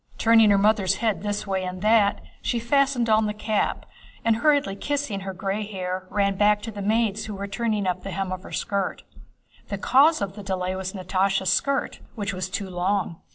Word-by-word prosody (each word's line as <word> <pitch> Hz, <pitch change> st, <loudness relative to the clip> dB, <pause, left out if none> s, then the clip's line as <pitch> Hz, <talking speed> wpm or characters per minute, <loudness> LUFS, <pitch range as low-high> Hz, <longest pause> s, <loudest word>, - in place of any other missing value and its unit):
Turning 225 Hz, -1 st, +5 dB
her 200 Hz, -, +5 dB
mother's 205 Hz, -2 st, +3 dB
head 220 Hz, -3 st, -1 dB
this 205 Hz, 0 st, -2 dB
way 190 Hz, -2 st, -1 dB
and 185 Hz, +1 st, -5 dB
that, 215 Hz, -2 st, +3 dB, 0.2 s
she 240 Hz, -, -1 dB
fastened 260 Hz, 0 st, +2 dB
on 215 Hz, -1 st, +3 dB
the 210 Hz, -, -3 dB
cap 215 Hz, -1 st, -1 dB, 0.4 s
and, 225 Hz, -1 st, +3 dB
hurriedly 285 Hz, -7 st, +2 dB
kissing 285 Hz, -3 st, -2 dB
her 190 Hz, 0 st, -5 dB
gray 195 Hz, +3 st, -3 dB
hair, 185 Hz, -2 st, -4 dB
ran 200 Hz, -1 st, +1 dB
back 210 Hz, +1 st, +3 dB
to 225 Hz, +2 st, -7 dB
the 205 Hz, -1 st, -7 dB
maids 220 Hz, 0 st, 0 dB
who 210 Hz, -, -5 dB
were 200 Hz, +1 st, -4 dB
turning 210 Hz, 0 st, -1 dB
up 180 Hz, 0 st, -1 dB
the 195 Hz, -, -6 dB
hem 190 Hz, 0 st, -3 dB
of 185 Hz, 0 st, -4 dB
her -, -, -12 dB
skirt. 200 Hz, -2 st, -2 dB, 0.6 s
The -, -, -4 dB
cause 295 Hz, +5 st, +4 dB
of 195 Hz, -1 st, -3 dB
the 205 Hz, -, -9 dB
delay 185 Hz, -1 st, -2 dB
was 190 Hz, 0 st, -4 dB
Natásha's 190 Hz, 0 st, +1 dB
skirt, 275 Hz, -1 st, -1 dB, 0.2 s
which 205 Hz, -2 st, -3 dB
was 185 Hz, 0 st, -4 dB
too 195 Hz, +1 st, -3 dB
long. 180 Hz, -1 st, -1 dB
200 Hz, 200 wpm, -24 LUFS, 190-220 Hz, 0.6 s, Turning